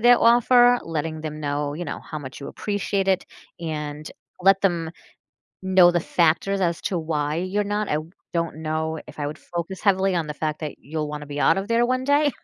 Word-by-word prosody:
their 240 +1 +7
offer, 245 +1 +6
letting 160 -1 -3
them 155 -1 -6
know, 145 0 -2
you 175 +2 -4
know, 145 - -5
how 155 - -7
much 135 -2 -9
you 140 - -6
appreciate 200 -1 -2
it, 190 -1 +2 0.4
and 150 -2 -5 0.3
let 195 +1 +5
them 170 -4 +1 0.7
know 185 -2 +6
the 175 -1 +1
factors 170 +4 +1
as 170 -2 0
to 185 - -1
why 150 -2 -1
you're 190 +4 -1
not 205 +1 -1
I 150 - +2 0.3
don't 170 -3 -1
know 160 0 -2
if - - -12
I 145 - -2
would 150 - -6
focus 175 +2 -5
heavily 195 -2 +3
on 165 -3 0
the 150 - -4
fact 155 +1 -3
that 150 -3 -5
you'll 150 +1 -4
wanna 150 0 -6
be 145 0 -5
out 165 - +4
of 195 - -4
there 230 +1 +3
one 255 +1 0
day. 285 +1 +3
170 Hz, 205 wpm, -24 LUFS, 155-195 Hz, 0.7 s, their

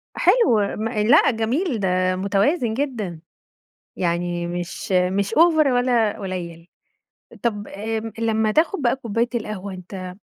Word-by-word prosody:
حلو، 390 - +4 0.2
م 220 +1 -2
لأ، 230 +6 +4
جميل، 240 - -1
ده 185 -1 +1
متوازن 210 - +1
جدًا. 225 - -3 0.8
يعني 175 0 -1
مش 175 +4 -5
مش 190 +3 +1
أوڤر 315 -1 +5
ولا 245 -4 +1
قليل. 175 -4 -6 0.8
طَب، 210 -3 -2
آمم، 220 +2 -4
لمّا 220 -1 +1
تاخد 325 - +1
بَقى 240 0 +2
كوباية 235 -2 -1
القهوة، 210 -4 -4
أنت 185 0 -8
215 Hz, 125 wpm, -22 LUFS, 185-245 Hz, 0.8 s, أوڤر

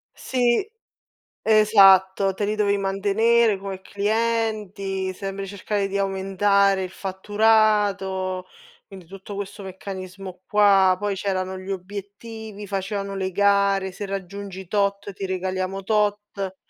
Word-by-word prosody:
Sì, 245 - +1 0.7
esatto, 195 -3 +5
te 205 +2 -2
li 210 +1 -1
dovevi 205 -1 +2
mantenere 205 +3 +2
come 190 -1 -7
clienti, 205 -3 -1
sempre 195 +1 -5
cercare 200 +1 -2
di 195 0 -3
aumentare 195 0 +2
il 185 - -5
fatturato, 200 -2 +1 0.4
quindi, 190 -4 -12
tutto 195 +3 -10
questo 200 +1 -6
meccanismo 190 -1 -8
qua, 200 -3 +5
poi 205 -1 -1
c'erano 190 -1 -2
gli 185 +1 -10
obiettivi, 205 +3 -7
facevano 195 0 -3
le 190 -1 -2
gare, 200 0 +2
"Se 200 +3 -6
raggiungi 195 -1 -6
tot 200 0 -1
ti 195 +1 -5
regaliamo 185 +1 -3
tot." 205 -2 -1
195 Hz, 115 wpm, -23 LUFS, 190-205 Hz, 0.7 s, esatto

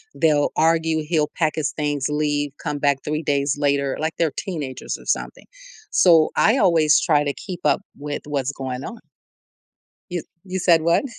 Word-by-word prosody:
they'll 150 -3 +2
argue, 160 0 +2
he'll 155 -1 +1
pack 155 -2 +1
his 145 -6 -1
things, 145 -2 -1
leave, 145 -1 -1
come 145 - -2
back 140 -1 +1
3 155 +1 -2
days 140 -1 0
later, 140 -2 0
like 160 +1 -2
they're 165 -3 +1
teenagers 150 -9 -5
or - - -16
something, - - -3 0.5
so, 165 - +5
I 220 +5 +4
always 165 - +4
try 150 -4 +3
to 145 - -1
keep 180 +1 -7
up 150 - +3 0.2
with 145 0 -5
what's 140 -2 -2
going 130 -1 -5
on. 235 0 -8 1.1
You 175 -2 -3 0.2
you 190 -1 -4
said 170 -2 +4
what? 170 - +2
150 Hz, 170 wpm, -22 LUFS, 145-165 Hz, 1.1 s, so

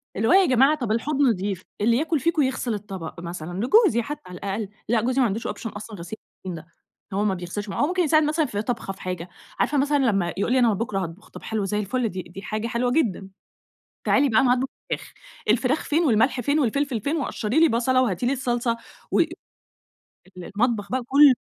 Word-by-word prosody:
اللي 215 +3 0
هو - - +5
يا 385 0 +7
جماعة 270 +3 +4
طَب 240 -6 -2
الحوض 275 +6 0
نضيف، 200 -6 +1 0.2
اللي 230 +2 +4
ياكل 315 +2 0
فيكم 325 +1 +1
يغسِل 260 -3 0
الطبق 190 -6 -6
مثلًا 170 0 -6
لجوزي 395 - +5
حتى 295 +6 -6
على 180 -1 -9
الأقل، 200 +2 -3 0.2
لأ 230 -2 +3
جوزي 255 +3 0
ما - - +5
عندوش 225 +3 -3
option 225 - -5
أصلًا 210 +1 -7
غسيل 175 +6 -7 0.3
المواعين 165 -3 -6
ده، 170 - -33 0.5
هو 205 - +2
ما 200 - +2
بيغسلش 185 +3 -5
معا - - -2
هو 290 - +3
ممكن 360 0 +1
يساعد 310 0 +4
مثلًا 305 +1 +1
في 205 -5 -3
طبخة 225 -4 -3
في - - -16
حاجة، 180 -1 -4 0.3
عارفة 290 - +2
مثلًا 290 +1 +2
لما 195 - +1
يقول 200 - 0
لي 260 - +4
أنا 235 -3 +4
بُكرة 205 -1 -2
هاطبخ، 180 +2 -7
طَب - - -11
حلو 215 -3 -2
زي 210 +1 -1
الفل 225 +3 -1
دي 185 0 -5
دي 190 +3 -10
حاجة 215 +2 -3
حلوة 245 +2 0
جدًا، 210 - 0 0.7
تعالي 275 0 +3
بقى 220 - +4
أنا 250 -2 +4
هاطبخ 260 +1 0 0.2
فراخ، - - -4 0.4
الفراخ 255 +7 +2
فين 320 +3 +1
والملح 250 +1 +3
فين 285 +6 +1
والفلفل 270 -2 0
فين 300 +7 -1
وقشّري 255 -1 0
لي 330 - +6
بصلة، 255 +2 +2
وهاتي 200 -3 0
لي 255 - +2
الصلصة 240 -3 -1 0.3
و - - +3
ال - - +4 1.2
المطبخ 210 -1 -1
بقى 260 0 0
كل 280 0 +7
235 Hz, 215 wpm, -24 LUFS, 200-270 Hz, 1.2 s, يا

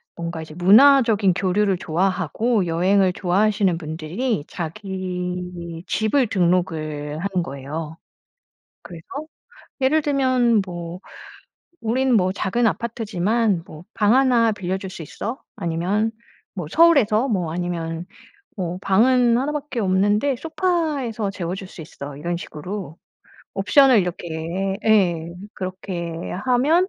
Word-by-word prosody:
뭔가 170 -1 -5
이제 155 - -11
문화적인 215 - +6
교류를 195 +1 +1
좋아하고 190 +5 0
여행을 185 +3 +3
좋아하시는 195 0 +1
분들이 165 - -3
자기 180 -1 -5
집을 235 +4 +1
등록을 160 -6 0
하는 185 0 -1
거예요. 150 +3 -6 0.9
그래서 170 -2 -11 0.8
예를 295 +4 +3
들면 255 -6 +2
뭐 175 -1 -6 0.8
'우리는 255 +3 +1
뭐 185 -3 +3
작은 215 +5 +1
아파트지만 220 -3 0
뭐 155 +1 -11
방 210 +2 +3
1 245 -4 +4
빌려줄 190 -1 -4
수 185 - -9
있어.' 230 - -6 0.2
아니면 180 +7 0 0.4
뭐 180 -6 -4
'서울에서' 275 - +4
뭐 180 -7 -1
아니면 170 -1 -3 0.5
뭐 180 -1 -3
'방은 240 +4 +4
1 270 +4 0
밖에 290 -4 -4
없는데 205 +8 +2
소파에서 305 - -1
재워줄 185 +1 -5
수 170 - -10
있어.' 145 -2 -9
이런 170 +4 -3
식으로. 175 0 -7 0.6
옵션을 230 +5 +5
이렇게 175 +2 -3
예. 175 -6 +2 0.2
그렇게 185 -2 -5 0.4
하면 300 +9 +3
190 Hz, 250 characters per minute, -22 LUFS, 170-230 Hz, 0.9 s, 문화적인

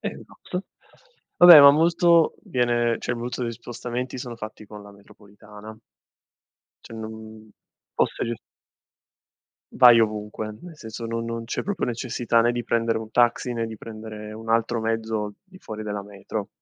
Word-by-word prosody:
esatto. 180 +2 -7 0.7
Va 175 - +8
beh, 170 -4 +12
ma 140 0 +10
molto 170 +2 +3
viene 120 -2 0
cioè, - - -3
voluto 120 +1 -5
degli 115 - -2
spostamenti 120 +2 -6
sono 120 -1 -7
fatti 110 -1 -9
con 105 0 -11
la 100 0 -14
metropolitana. 105 +1 -15 1.1
Cioè, - - -11
non 110 -1 -10 0.5
fosse - - 0
ge 120 - -2 1.4
Vai 120 -2 +8
ovunque, 105 0 -3
nel 175 -2 -11
senso 115 -4 -8
no 115 0 -3
non 115 0 -5
c'è - - -3
proprio 205 +1 -2
necessità 120 -1 0
né 120 - +2
di 120 0 -3
prendere 115 -1 0
un 110 -1 -9
taxi, 120 +1 +1
né 115 -1 -2
di 110 -1 -9
prendere 110 -1 -9
un 115 +1 -7
altro 115 0 +1
mezzo 110 -2 -2
di 190 -1 -18
fuori 110 -10 -8
della 105 -1 -4
metro. 100 +1 -6
115 Hz, 155 wpm, -24 LUFS, 110-120 Hz, 1.4 s, beh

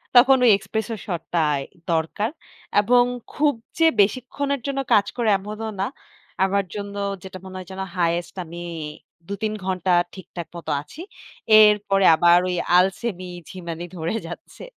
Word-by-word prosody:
তখন 260 +2 +8
ওই - - +7
espresso 220 +2 -3
shot 175 -4 -3
টাই 150 -3 +2 0.3
দরকার। 165 +7 0 0.5
এবং 245 +3 +5 0.3
খুব 295 -1 +2 0.3
যে 325 - +5 0.2
বেশিক্ষণের 260 +5 -1
জন্য 275 -1 -1
কাজ 205 - +5
করে 235 -2 +1
এমনও 210 +3 -6
না। 195 - +1 0.6
আমার 195 +1 +1
জন্য 200 -1 -5 0.3
যেটা 190 0 -8
মনে 185 - -9
হয় 185 -1 -8
যেন 190 0 -5 0.2
highest 170 0 0
আমি 170 +2 -8 0.7
২-৩ 215 +2 -3
ঘণ্টা 185 -1 0 0.2
ঠিকঠাক 175 -3 -8
মতো 165 -2 -5
আছি। 300 - -12 0.6
এরপরে 205 -2 +4
আবার 175 +2 +6
ওই 180 - -1 0.2
আলসেমি, 185 0 0 0.2
ঝিমানি 170 -2 -6
ধরে 165 +5 -2
যাচ্ছে। 175 - -10
195 Hz, 140 wpm, -23 LUFS, 175-220 Hz, 0.7 s, তখন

